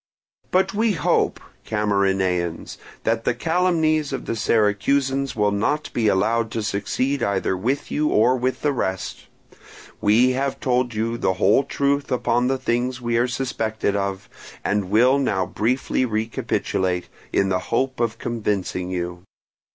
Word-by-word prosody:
"But 190 +1 +2
we 220 +1 +2
hope, 165 - +1 0.2
Camarinaeans, 95 -5 0 0.2
that 115 0 0
the 115 - +1
calumnies 160 -1 +1
of 135 - -4
the - - -2
Syracusans 130 +6 +1
will 105 -2 +2
not 110 +9 -1
be 115 -3 +1
allowed 110 +4 +2
to 110 - -2
succeed 125 +7 -1
either 95 -1 0
with 125 +10 -2
you 150 0 +1
or 120 +2 +4
with 130 +1 -1
the 150 - +3
rest: 95 -7 -3 0.7
we 110 +5 +4
have 135 +1 -2
told 125 -2 0
you 115 +2 -1
the 95 - +1
whole 100 +8 +4
truth 140 +1 -1
upon 125 0 +1
the 135 +1 +1
things 125 0 -1
we 120 -1 0
are 120 +2 +2
suspected 110 -5 -2
of, 100 -1 -2 0.4
and 100 -2 0
will 125 +7 +4
now 100 -9 0
briefly 120 +8 0
recapitulate, 110 -5 -1 0.2
in 95 - +2
the 90 -1 +1
hope 130 +2 0
of 115 -2 0
convincing 100 -5 -2
you. 90 -1 -4
115 Hz, 145 wpm, -22 LUFS, 100-130 Hz, 0.7 s, or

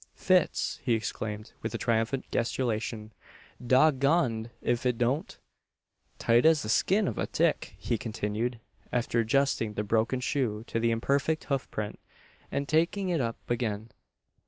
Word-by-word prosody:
"Fits!" 185 -3 +2
he 120 -2 +2
exclaimed, 105 -1 -4
with 110 - -3
a - - 0
triumphant 115 +3 0
gesticulation, 115 -2 -2 0.5
"Dog 130 +3 +4
goned 125 -6 +2
if 120 0 0
it 125 -2 +1
don't!" 125 +6 0 0.8
"Tight 115 +1 +3
as 160 -1 +5
the 110 - -5
skin 195 - +3
o' - - -1
a - - -1
tick!" - - 0
he 115 - -2
continued, 110 +1 -2 0.3
after 120 -1 0
adjusting 115 -2 +1
the 105 - -1
broken 115 +4 +1
shoe 120 -5 -1
to 115 - -2
the 115 0 +2
imperfect 140 +7 +1
hoof 140 -2 -2
print, 105 -1 -4 0.5
and 140 0 -1
taking 170 +6 +1
it 170 -5 +1
up 115 -2 -2
again. 115 -2 -2
120 Hz, 150 wpm, -29 LUFS, 110-140 Hz, 0.8 s, as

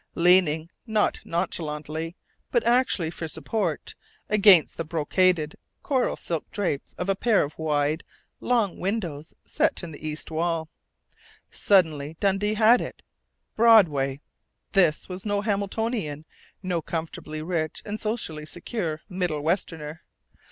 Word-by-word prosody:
Leaning 170 -2 +4 0.2
not 215 -2 +1
nonchalantly, 160 0 -3 0.3
but 485 - +2
actually 235 -9 +2
for 165 - -5
support 175 -1 -2 0.4
against 200 -5 +6
the 165 - -3
brocaded 165 0 +1 0.3
coral 260 -3 +1
silk 165 -2 -3
drapes 180 -9 -2
of 180 - -3
a 195 - +2
pair 215 +1 +3
of 145 +1 -6
wide, 150 0 0 0.4
long 230 -6 0
windows 175 -7 -3
set - - 0
in 170 - -6
the 150 - -11
east 155 +1 -5
wall. 165 0 -1 0.8
Suddenly 160 -6 +2
Dundee 205 +2 +1
had 225 +3 +5
it.... - - -7 0.5
Broadway! 155 -12 +5 0.5
This 175 -6 +3
was 185 0 -6
no 205 -1 0
Hamiltonian, 205 - -2 0.4
no 180 -3 -1
comfortably 155 -1 -5
rich 160 -2 -2
and 210 +1 -5
socially 165 -9 -3
secure 170 -2 -4
Middle 180 -6 -2
westerner. 160 -2 -2
170 Hz, 125 wpm, -25 LUFS, 155-205 Hz, 0.8 s, against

